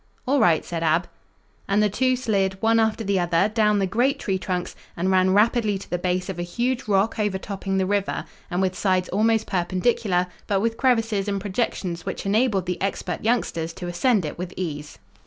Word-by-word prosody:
"All 280 +2 +3
right," 165 -7 +3
said 170 -1 -4
Ab. 165 +2 +2 0.6
And 205 +2 +3
the - - +4
two 255 +5 +1
slid, 195 -6 0
one 225 +1 +3
after 220 0 +1
the 200 -2 +1
other, 175 +3 +2
down 210 -2 +3
the 195 - +2
great 245 +9 +1
tree 190 -8 -2
trunks 180 -1 -3 0.2
and 185 +3 0
ran 185 0 +4
rapidly 215 -1 +3
to 190 - -10
the 175 - -2
base 180 0 -1
of 190 -3 -5
a - - -1
huge 240 +8 -2
rock 205 +2 +1
overtopping 195 -1 -2
the 190 - +2
river, 200 0 -1 0.2
and 180 +1 0
with 185 -1 0
sides 185 -2 +1
almost 220 +2 +2
perpendicular, 185 +1 0 0.2
but 200 -2 +1
with 225 +2 0
crevices 225 -6 +1
and 200 -1 -1
projections 190 -4 -2
which - - -5
enabled 205 -2 +2
the 180 -1 -3
expert 195 +1 -3
youngsters 175 -8 0
to 180 - -7
ascend 190 +2 +1
it 150 - -6
with 180 0 -6
ease. 150 -5 -5
195 Hz, 195 wpm, -24 LUFS, 180-220 Hz, 0.6 s, the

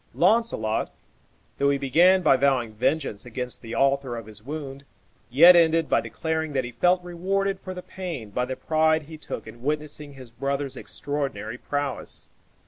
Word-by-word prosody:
Launcelot, 180 - +2 0.7
though 140 - +3
he 140 - +2
began 175 +8 +4
by 135 - +6
vowing 130 -4 +1
vengeance 130 -1 -1
against 125 +1 -5
the 115 -1 -6
author 135 -3 +1
of 115 - -7
his 105 -1 -10
wound, 140 0 -6 0.5
yet 170 +9 +8
ended 165 -1 +4
by - - +2
declaring 160 -2 -3
that 130 -2 +1
he 120 - -6
felt 180 +7 +2
rewarded 190 +3 -1
for 185 -1 -7
the 180 - -7
pain 165 - -6
by 125 +4 -1
the 130 - -4
pride 155 +3 +2
he 160 +2 -10
took 155 - -6
in 120 - -12
witnessing 150 +1 -3
his 130 -3 -12
brother's 140 +3 -2
extraordinary 135 -5 -4
prowess. 145 -2 -4
140 Hz, 165 wpm, -25 LUFS, 125-165 Hz, 0.7 s, yet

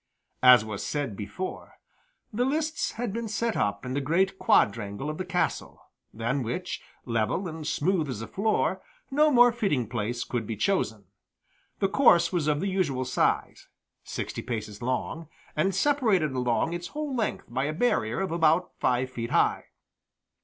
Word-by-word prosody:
As 125 -3 +8
was 105 -2 -5
said 140 -8 -2
before, 105 - -6 0.6
the 240 +4 +1
lists 310 +4 -1
had 230 -3 -3
been 230 0 -3
set 220 +1 -1
up 100 +4 -1
in 125 - -3
the 140 - 0
great 185 +7 +1
quadrangle 100 +6 +2
of 155 - -8
the 185 - -2
castle, 180 - -2 0.3
than 120 +5 -1
which, 175 +10 -4 0.2
level 115 - 0
and 160 -2 -6
smooth 160 0 0
as 125 - -4
a 115 - -5
floor, 215 +2 0 0.3
no 300 +3 +4
more 245 -3 +6
fitting 195 - 0
place 120 +1 -2
could 115 -4 -3
be 115 - -3
chosen. 110 - 0 0.7
The 195 - +2
course 185 -7 +4
was 165 -4 0
of 150 0 +1
the 200 - -1
usual 160 -10 0
size 125 - 0 0.4
sixty - - -5
paces 110 -3 -5
long 130 +6 -2 0.3
and 185 +5 +1
separated 215 - +2
along 125 +5 0
its 175 0 -4
whole 300 -3 -4
length 225 -3 -2
by 130 +3 -2
a 150 - -1
barrier 155 - +1
about 170 -1 +2
five 125 +1 +1
feet 115 -2 -4
high. - - +2
155 Hz, 160 wpm, -27 LUFS, 120-195 Hz, 0.7 s, As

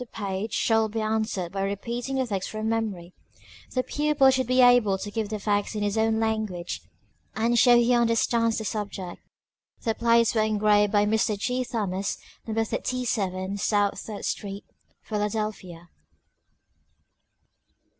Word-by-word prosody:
the 250 - -6
page 200 -1 -4
shall 225 -1 +2
be 225 +2 -3
answered 215 -5 -1
by 195 0 -3
repeating 235 +7 -3
the 260 -1 +1
text 200 -5 -3
from 215 0 -4
memory; 210 -6 -2 0.6
the 255 - +2
pupil 295 -2 +3
should 260 -1 0
be 255 +1 +2
able 245 -6 +5
to 205 +2 -6
give 215 -1 -2
the 215 - -3
facts 205 +1 -1
in 210 - -1
his 205 0 0
own 220 0 +2
language, 215 -6 -2 0.5
and 230 +2 +2
show 245 +1 +7
he 240 +1 +4
understands 230 -1 +2
the 220 - -4
subject. 200 -4 -5 0.6
The 225 - +1
Plates 230 0 +3
were 220 - +2
engraved 210 -1 +3
by 205 -1 +3
Mr. 215 0 +1
G. 250 +5 -1
Thomas, 200 -5 -2 0.3
No. 225 0 0
37 200 -6 -2
South 205 0 +1
Third 215 -2 -7
Street, 200 -1 -4 0.4
Philadelphia. 210 -5 -4
215 Hz, 145 wpm, -26 LUFS, 200-230 Hz, 0.6 s, show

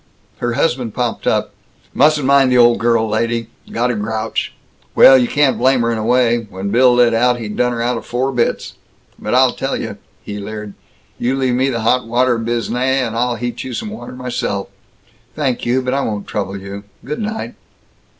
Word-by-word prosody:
Her 120 -1 -1
husband 120 -5 -1
popped 120 -2 -2
up. - - 0 0.4
"Mustn't 150 0 +3
mind 135 -1 +4
the 125 - +4
old 120 -1 +5
girl, 115 -1 +2
lady. 115 +1 -1 0.2
Got 125 +2 0
a - - -2
grouch. 110 +1 -3 0.4
Well, 135 - +8
you 125 -2 +3
can't 145 -1 +2
blame 130 0 +3
her, 115 0 +1
in 115 - -2
a - - -3
way; 120 0 +3
when 95 +1 -5
Bill 125 +2 +5
lit 120 -1 +4
out, 120 +2 +2
he 115 - -5
done 125 +3 0
her 115 -1 -2
out 125 +1 0
of - - -8
four 130 +3 -1
bits! 120 -2 -1 0.5
But - - -2
I'll - - +5
tell - - -3
you!" - - -6 0.2
he 105 0 -6
leered. 105 0 -7 0.5
"You 125 +3 0
leave 130 -2 0
me 130 +2 +1
the 115 -3 -2
hot 125 +2 +1
water 120 0 +2
biznai, 120 +2 -1 0.2
and 115 -1 -5
I'll 120 +1 0
heat 120 +1 -4
you 130 -2 -6
some 215 - -5
water 220 - -8
myself!" 120 -6 -3 0.7
"Thank 135 -6 -1
you, 130 +2 +1
but 125 0 -1
I 140 - +1
won't 105 -5 -3
trouble 100 -2 -4
you. 100 +1 -8 0.2
Good 150 +3 -4
night." 220 0 -4
120 Hz, 200 wpm, -17 LUFS, 115-130 Hz, 0.7 s, Well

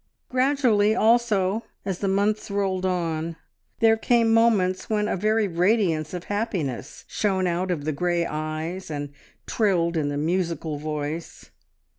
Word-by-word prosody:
Gradually, 255 -5 +3
also, 220 -3 +2 0.2
as 190 -3 -3
the 200 - -1
months 205 +3 0
rolled 190 -2 0
on 165 -2 -2 0.5
there 225 -1 +6
came 230 0 +3
moments 205 -5 +2
when 210 -1 +1
a - - 0
very 215 +2 +1
radiance 175 -3 +1
of 175 - -5
happiness 185 - -3
shone 190 -3 0
out 180 +1 -1
of 155 -5 -2
the 155 - 0
grey 175 +2 0
eyes, 155 +4 -4
and 145 -2 -4 0.3
trilled 175 -6 +1
in 150 -3 0
the 145 - -3
musical 165 -1 -1
voice. 150 +2 -5
185 Hz, 140 wpm, -24 LUFS, 160-215 Hz, 0.5 s, there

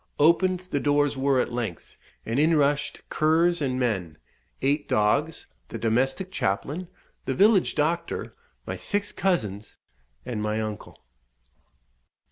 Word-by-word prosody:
Opened 175 +4 +3
the 180 -6 -3
doors 145 0 +2
were 135 0 +2
at 125 - -1
length, 115 -8 -5 0.3
and 115 +4 -1
in 160 +2 +4
rushed 145 0 0
curs 165 +2 +2
and 130 -2 -1
men, 95 -11 -1 0.5
eight 145 +2 +1
dogs, 140 +10 +1 0.2
the - - -6
domestic 135 +11 0
chaplain, 145 - -2 0.4
the - - -1
village 200 0 +4
doctor, 160 +3 -1 0.3
my - - -4
six 205 0 -2
cousins, 105 - -2 0.5
and 120 -4 -3
my 105 +1 -1
uncle. 110 -1 -6
145 Hz, 125 wpm, -26 LUFS, 115-170 Hz, 0.5 s, in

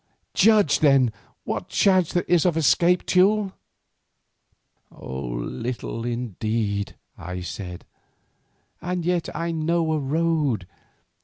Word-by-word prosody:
Judge, 210 -9 +4
then, 135 -6 +4 0.3
what - - -4
chance 185 -4 +3
there 175 - +1
is 175 -2 +2
of 175 -3 +1
escape, 170 +4 +3
Teule." 195 +1 +3 1.4
"Little 65 - -5
indeed," 110 -3 -2 0.2
I 90 0 -6
said, 90 0 -7 1.0
"and 175 -1 -3
yet 175 -1 0
I 170 0 -2
know 165 0 0
a 155 - 0
road. 150 - 0
155 Hz, 100 wpm, -24 LUFS, 110-175 Hz, 1.4 s, Judge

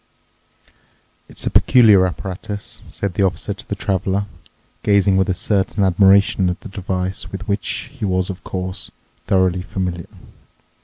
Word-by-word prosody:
"It's - - -6
a - - -1
peculiar 105 -7 +6
apparatus," 95 +3 -6
said 100 -2 -3
the - - -1
Officer 95 -4 0
to - - -14
the - - -1
Traveler, 95 +1 -1 0.6
gazing 100 -2 +3
with 95 +1 +2
a 95 - +1
certain 100 +2 0
admiration 95 0 +4
at 90 - -4
the - - -9
device, 95 -1 -3
with 95 - -7
which 100 0 -2
he 135 -5 -9
was, 95 0 0
of 90 - -10
course, 90 0 -4 0.4
thoroughly 95 -1 +2
familiar. 90 -2 -4
95 Hz, 145 wpm, -20 LUFS, 90-100 Hz, 0.6 s, peculiar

